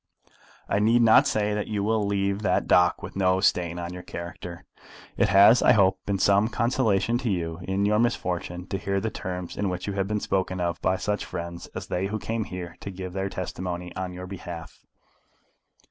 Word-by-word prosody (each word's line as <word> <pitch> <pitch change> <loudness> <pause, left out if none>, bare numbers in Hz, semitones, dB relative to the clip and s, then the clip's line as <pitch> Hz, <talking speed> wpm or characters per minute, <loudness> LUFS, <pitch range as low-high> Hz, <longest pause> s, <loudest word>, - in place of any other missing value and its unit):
I 100 - +1
need 115 +3 +4
not 110 -1 +6
say 105 -1 0
that 105 0 -2
you 105 -2 -2
will 110 0 +1
leave 100 0 0
that 95 -3 +1
dock 90 +1 +3
with - - -7
no 95 -1 +2
stain 90 -3 +1
on 85 0 -5
your 90 - -7
character. 85 0 -8 0.5
It - - +2
has, 100 +5 +7
I 125 - +6
hope, 95 -3 +3
been 100 -1 +1
some 100 +2 +4
consolation 115 -1 +1
to 125 - -2
you 85 -3 -2
in 95 +1 +1
your 105 +1 +3
misfortune 90 -6 -1
to 95 - -2
hear 100 0 -1
the 110 +2 -2
terms 90 -2 -5
in 100 -1 -1
which 90 0 -4
you 100 - -3
have 95 -1 -1
been 105 0 -1
spoken 95 -2 -1
of 85 -2 -2
by 95 - +2
such 105 +1 -2
friends 85 0 -6
as - - -5
they 90 +2 -2
who 110 +2 -3
came 110 0 -3
here 90 -3 -7
to - - -7
give 95 -1 -7
their 95 0 -2
testimony 90 -1 -5
on 95 +1 -3
your 90 +1 -7
behalf. 85 -4 -8
95 Hz, 205 wpm, -26 LUFS, 90-105 Hz, 0.5 s, has